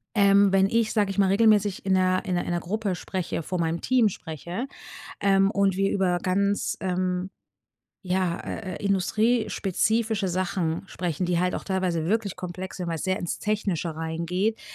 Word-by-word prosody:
ähm, 200 -1 +5
wenn 195 0 +5
ich, 230 +1 +1
sage 205 -3 +2
ich 195 - -7
mal, 195 -1 +4
regelmäßig 205 -2 +3
in 190 - +2
'ner 185 0 +2
in 185 -2 -1
'ner 175 - -1
in - - -3
'ner 175 - -1
Gruppe 200 0 -2
spreche, 175 -3 -4
vor 180 +2 -3
meinem 165 0 -1
Team 250 -4 +3
spreche, 175 - -6 0.5
ähm, 195 0 +4
und 195 -2 +2
wir 195 0 +2
über 180 -3 +1
ganz, 200 +2 0
ähm, 185 0 -1 0.8
ja, 180 -1 0
äh, 185 -5 -5
äh, 200 - -6
industriespezifische 215 +1 +1
Sachen 180 -1 -1
sprechen, 175 0 -2
die 175 -1 +1
halt 180 0 +1
auch - - -5
teilweise 185 -4 -1
wirklich 210 0 0
komplex 185 +1 -6
sind, 180 - -4
weil 165 - -1
es - - -5
sehr 185 0 0
ins 175 - -3
Technische 190 -6 -1
reingeht, 170 +7 -1
190 Hz, 180 wpm, -26 LUFS, 180-200 Hz, 0.8 s, ähm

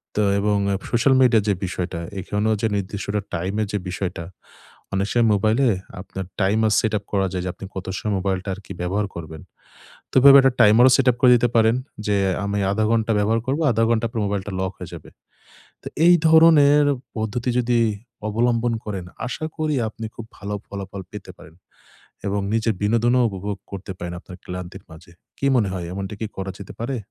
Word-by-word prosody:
তো 105 - +2 0.2
এবং 105 +1 +1 0.2
app 95 - -6
social 125 +3 +3
মিডিয়ার 115 -5 +4
যে - - +4
বিষয়টা, 90 -1 -4 0.2
এখানেও 105 +3 0
যে 115 - +2
নির্দিষ্ট 100 +1 -4 0.3
টাইমের 100 +5 -2
যে - - +1
বিষয়টা 90 -2 -4 0.7
অনেক 100 +1 0
সময় 120 -1 +3
মোবাইলে 110 +6 +2 0.3
আপনার 95 0 -7
টাইমার 105 +3 +2
সেটআপ 110 -2 -1
করা 100 -1 +1
যায় 90 -1 -2
যে, - - -2
আপনি 100 - -10
কত 95 - -5
সময় 105 - -2
মোবাইলটা 95 0 -2
আরকি 100 - -13
ব্যবহার 100 +4 -1
করবেন। 80 -2 -8 0.7
তো - - -14
এভাবে 140 +1 +9
একটা 135 0 +4
টাইমারও 115 +4 +6
সেটআপ 125 -2 +3
করে 125 -2 +7
দিতে 120 0 +2
পারেন। 115 0 +4 0.3
যে 105 - +2 0.3
আমি 100 0 -1
১/২ 110 +2 +1
ঘন্টা 115 0 +1
ব্যবহার 110 +2 +2
করবো। 140 +5 0
১/২ 115 0 +1
ঘন্টা 115 0 +1
পর 115 - -16
আপনার 110 - 0
মোবাইলটা 100 0 -3
লক 95 -1 -1
হয়ে - - -8
যাবে। - - -10 0.7
তো - - -8 0.2
এই 175 +1 +8
ধরনের 155 -3 +6 0.3
পদ্ধতি 110 +3 -2
যদি 120 0 +1 0.5
অবলম্বন 115 +2 +1
করেন, 100 -4 -5 0.2
আশা 155 - -4
করি 155 -2 0
আপনি 110 +1 -8
খুব 115 - -8
ভালো 105 0 -5
ফলাফল 100 -1 -7
পেতে 105 -2 -9
পারেন 80 - -15 0.7
এবং 100 +1 0
নিজের 115 -1 +1
বিনোদনও 115 +4 +2
উপভোগ 100 0 -5 0.2
করতে 100 0 -6
পারেন 85 0 -5
আপনার 90 - -12
ক্লান্তির 90 +1 -7
মাঝে। 80 +2 -14 0.3
কী 140 - -1
মনে 105 -5 +2
হয় 90 -3 -4
এমনটা 95 +1 -5
কি 110 - -2
করা 95 0 -4
যেতে 100 - -9
পারে? 130 +3 -2
105 Hz, 185 wpm, -22 LUFS, 95-115 Hz, 0.7 s, এভাবে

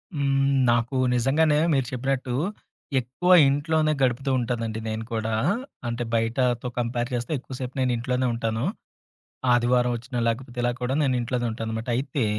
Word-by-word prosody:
హ్మ్. 135 -1 +2 0.2
నాకు 120 +2 +1 0.2
నిజంగానే 150 +5 +3 0.2
మీరు 135 -2 +2
చెప్పినట్టు, 130 0 -2 0.7
ఎక్కువ 130 +9 -1 0.2
ఇంట్లోనే 155 +2 +1
గడుపుతూ 130 +1 +1
ఉంటానండి 115 -2 -2
నేను 110 +1 -3
కూడా, 110 -1 -1 0.5
అంటే, 120 +1 -2
బయటతో 120 +2 +1
కంపేర్ 120 +1 -1
చేస్తే 120 +4 -2
ఎక్కువ 130 - -9
సేపు 130 0 -5
నేను 125 -1 +2
ఇంట్లోనే 125 +2 -1
ఉంటాను. 115 0 -2 0.9
ఆదివారం 120 0 +3
వచ్చినా, 120 +2 -6
లేకపోతే 120 +2 -4
ఇలా 120 - +2
కూడా 125 +2 -1
నేను 130 -3 +2
ఇంట్లోనే 120 0 -1
ఉంటాననమాట. 110 +1 -4
అయితే, 135 -1 -1
125 Hz, 140 wpm, -25 LUFS, 115-135 Hz, 0.9 s, నిజంగానే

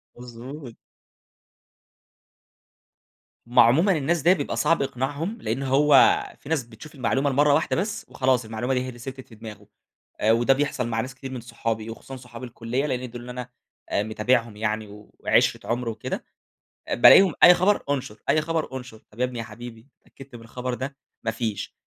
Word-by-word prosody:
مضبوط. 125 +2 -10 2.7
هُم 120 - +2
عمومًا 140 - +6
الناس 155 +2 0
ديّة 175 +5 +5
بيبقى 145 -6 -3
صعب 165 +2 +2
إقناعهم، 140 - -3
لأنه 135 +5 -2
هو 140 +1 +5 0.2
في 140 - -12
ناس 160 -5 0
بتشوف 120 +6 -14
المعلُومة 135 +2 0
لمرة 145 +2 +3
واحدة 155 - +1
بس 210 +4 -3
وخلاص، 130 -3 +1
المعلُومة 115 +4 -2
دي 125 - +1
هي - - -6
اللي 120 -2 -9
ثبَتت 130 +1 -8
في 115 - -15
دِماغه، 105 -2 -11 0.6
وده 120 +4 +4
بيحصل 135 -3 -1
مع 115 -1 -1
ناس 130 +3 -7
كتير 135 0 -8
من 125 -3 -6
صحابي، 115 -1 -4
وخصوصًا 125 +4 -9
صحاب 125 -1 -11
الكلية، 120 +3 -3
لإن 125 -3 -3
دول 120 0 -9
اللي 125 +1 -8
أنا 125 0 -7 0.4
متابعهم 110 +2 0
يعني 110 0 -2 0.3
وعشرة - - +2
عُمر 120 0 -1
وكده. 110 -1 -5 0.7
بالاقيهم 180 +7 +7
أي 180 - +10
خبر 195 +4 +2
انشُر، 125 -6 -3
أي 155 - +4
خبر 155 -3 -2
انشُر. 125 -4 -9
"طب 110 +4 -14
يا - - +3
ابني 125 -2 -4
يا 115 - -4
حبيبي، 120 +2 -11
اتأكَّدت 135 -2 -15
من 115 - -13
الخبر 125 +2 -5
ده؟"، 135 +3 -6 0.3
ما 110 - +1
فيش. 110 -2 -4
125 Hz, 170 wpm, -24 LUFS, 115-140 Hz, 2.7 s, أي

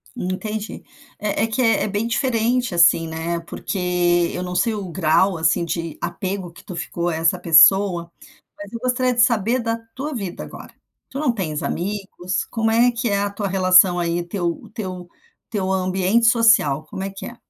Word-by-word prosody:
Entendi, 210 +1 -5 0.4
é 210 +1 -1
é - - +1
que 225 +3 -2
é 225 -2 +3
é - - -1
bem 210 +3 -2
diferente 240 -1 0
assim, 170 -1 +4
né? 165 +1 -3
Porque 175 -1 0
eu 180 - -4
não 180 0 -5
sei 220 +5 +1
o 200 -4 -5
grau, 175 +2 +2
assim, 160 +1 +2
de 165 -1 -4
apego 190 -2 -4
que - - -16
tu 180 - -8
ficou 170 +1 -3
a 165 - -2
essa 165 +3 +1
pessoa, 170 +1 +5 0.5
mas 205 0 -10
eu 230 - -6
gostaria 255 +1 0
de 240 - +2
saber 235 0 +2
da 230 -1 -2 0.2
tua 290 +4 -4
vida 195 -8 -5
agora. - - -11 0.4
Tu 275 - -6
não 290 -5 +1
tens 160 -9 -3
amigos? 190 -1 -3
Como 225 -1 0
é 235 +2 +4
que 235 0 -2
é 200 - +1
a 205 0 0
tua 200 0 -4
relação, 185 -1 +5
aí, 170 0 -1
teu 175 -1 -4
teu 185 -5 -6 0.4
teu 195 -4 -2
ambiente 190 +4 +1
social? 225 - +4
Como 190 - -7
é 195 - -3
que 195 +1 -9
é? 240 - -8
195 Hz, 190 wpm, -21 LUFS, 175-225 Hz, 0.5 s, pessoa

